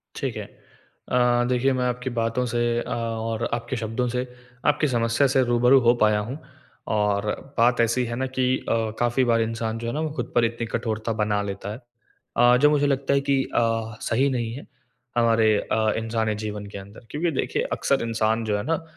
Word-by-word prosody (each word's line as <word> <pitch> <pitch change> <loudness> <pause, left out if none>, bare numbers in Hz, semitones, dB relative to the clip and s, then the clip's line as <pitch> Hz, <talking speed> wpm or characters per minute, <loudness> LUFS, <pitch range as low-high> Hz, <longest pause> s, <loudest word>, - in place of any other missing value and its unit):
ठीक - - -3
है। - - -5 0.6
अ, 120 -1 +3
देखिए 130 +2 +2
मैं 125 -1 0
आपकी 125 +1 -2
बातों 115 +2 0
से 120 0 -2 0.2
अ, - - -5
और 115 0 -2
आपके 120 +2 -3
शब्दों 115 +2 -2
से, 125 +1 -2 0.4
आपकी 150 - +3
समस्या 115 +2 +2
से 130 0 +3
रूबरू 125 +2 +4
हो 120 - +7
पाया 105 -1 +4
हूँ। 120 +8 -5 0.5
और 105 -1 +1 0.3
बात 120 +2 +4
ऐसी 115 +2 +2
है 120 0 -4
ना 130 +2 -1
कि 130 0 +1
अ, - - +3 0.3
काफ़ी 120 +2 +2
बार 115 -1 +3
इंसान 115 0 -2
जो 115 - -5
है 120 - -2
ना 150 - -2
वो 155 -2 -2
खुद - - -4
पर 120 -1 +4
इतनी 115 0 -2
कठोरता 115 -1 -2
बना 105 -1 0
लेता 100 0 -5
है। - - -7 0.6
अ, 120 +1 +6
जो 150 - +7
मुझे 145 -1 +2
लगता 140 0 +1
है 140 - +3
कि 135 -1 +3
अ, 115 -1 0
सही 130 +5 +1
नहीं 120 -4 -2
है 140 - -8 0.5
हमारे 115 -2 +4 0.2
अ, 110 -1 +2
इंसानी 110 -1 -1
जीवन 105 -1 -5
के - - -3
अंदर। 100 +4 -12
क्योंकि 165 +3 0
देखिए 135 - -1
अक्सर 140 - +1
इंसान 115 0 0
जो 105 -1 0
है 105 - -3
ना 165 +1 -1
115 Hz, 200 wpm, -24 LUFS, 110-125 Hz, 0.6 s, हो